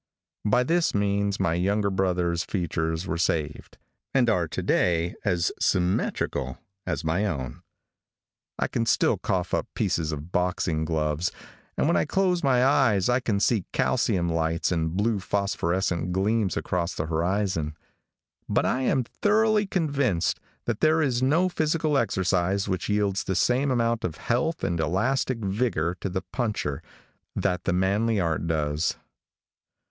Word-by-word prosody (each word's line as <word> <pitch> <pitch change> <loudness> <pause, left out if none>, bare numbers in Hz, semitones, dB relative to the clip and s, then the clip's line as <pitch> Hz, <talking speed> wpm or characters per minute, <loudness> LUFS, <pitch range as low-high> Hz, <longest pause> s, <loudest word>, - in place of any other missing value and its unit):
By 110 +4 +3
this 165 +2 +1
means 100 0 0
my 85 - +1
younger 100 +4 +1
brother's 90 -3 0
features 80 -2 -2
were 85 -2 -3
saved, 75 -3 -2 0.4
and 120 -4 +4
are 90 -6 +1
to - - -4
day 85 0 +1
as 85 -1 +1
symmetrical 90 +1 0 0.3
as - - -2
my 85 +6 0
own. 65 -9 -4 1.0
I - - 0
can 115 -1 -2
still - - +2
cough 90 -2 -2
up - - 0
pieces 80 -2 0
of 75 +3 -6
boxing 90 -3 0
gloves, 80 +2 -1 0.5
and - - +2
when - - +3
I 85 - +2
close 185 -2 +1
my 130 -2 +4
eyes 120 -8 +3
I 125 +1 +3
can 110 -5 -1
see 105 -2 +1
calcium 85 -2 +1
lights 80 0 0
and 80 0 -1
blue 105 0 +1
phosphorescent 95 -3 -1
gleams 100 +1 +1
across 90 -1 -2
the 80 - -2
horizon; 85 -1 -1 0.7
but - - +2
I 130 - +1
am 130 0 +2
thoroughly 210 - +2
convinced 140 - 0 0.3
that 120 -3 -2
there 160 +1 +3
is 125 -4 0
no 155 +8 +3
physical 155 -3 0
exercise 95 -4 +1
which 95 -1 -2
yields 105 -1 +1
the 95 - -1
same 130 +7 +2
amount 115 -2 +1
of 80 - -3
health 140 +8 -1
and 85 -2 0
elastic 115 - 0
vigor 95 -5 0
to 100 - -2
the 95 0 -3
puncher 105 - -2 0.5
that 90 - -1
the - - +1
manly 100 +4 +1
art 85 -2 -1
does. 75 0 0
95 Hz, 150 wpm, -26 LUFS, 85-120 Hz, 1.0 s, and